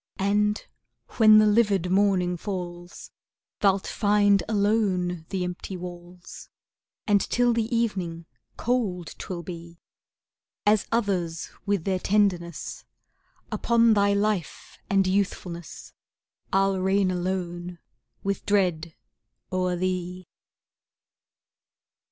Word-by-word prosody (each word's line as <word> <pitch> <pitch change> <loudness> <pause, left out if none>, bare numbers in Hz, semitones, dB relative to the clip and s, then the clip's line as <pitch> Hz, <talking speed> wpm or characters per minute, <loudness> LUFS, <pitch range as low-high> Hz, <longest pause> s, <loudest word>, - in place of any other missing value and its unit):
And 210 +2 +1 0.5
when 215 -1 +8
the 215 - +6
livid 205 -4 +2
morning 190 -2 +2
falls, 175 -2 -7 0.5
Thou'lt 195 -2 +2
find 205 -2 +3
alone 195 -6 0
the 190 -2 -2
empty 180 +1 -5
walls, 175 0 -10 0.6
And 205 -2 +3
till 245 0 +2
the 230 -1 0
evening, 195 -8 -2 0.3
cold 210 -9 -1
'twill 175 -2 -5
be. 170 0 -9 0.9
As 210 0 +3
others 185 -8 -1 0.2
with 200 -4 +1
their 190 0 0
tenderness, 185 -5 0 0.7
Upon 235 -1 +3
thy 200 -1 +3
life 200 -4 -2
and 195 -1 +3
youthfulness, 185 -3 -3 0.6
I'll 195 0 +2
reign 190 0 +2
alone 175 -1 -3 0.5
with 200 -1 -2
dread 175 -5 0 0.6
o'er 185 -1 0
thee. 180 0 -3
190 Hz, 100 wpm, -26 LUFS, 175-205 Hz, 0.9 s, when